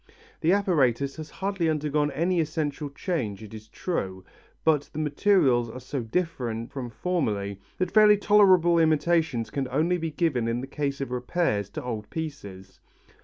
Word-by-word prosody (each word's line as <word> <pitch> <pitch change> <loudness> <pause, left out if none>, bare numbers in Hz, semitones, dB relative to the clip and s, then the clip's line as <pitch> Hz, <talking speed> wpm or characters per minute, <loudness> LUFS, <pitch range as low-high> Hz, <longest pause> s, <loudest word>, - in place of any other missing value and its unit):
The 165 - +2
apparatus 140 - +2
has 155 -1 -7
hardly 190 -4 -1
undergone 150 -1 0
any 170 +5 0
essential 150 -2 -3
change 135 - -3
it 110 0 -11
is 110 0 -10
true, 95 - -4 0.4
but 150 -3 +2
the - - -8
materials 150 - +2
are 125 - -8
so 130 +1 -4
different 120 -4 -3
from 130 -3 -5
formerly 105 - -2 0.2
that 185 - -1
fairly 210 0 +6
tolerable 185 -5 +5
imitations 160 -6 +2
can 135 -2 -2
only 160 +8 +1
be 165 0 -2
given 150 -7 0
in 115 +1 -1
the 130 - -4
case 140 0 -3
of 135 - -4
repairs 125 - -1
to - - -5
old 110 -4 -5
pieces. 100 -13 -7
145 Hz, 160 wpm, -26 LUFS, 120-170 Hz, 0.4 s, fairly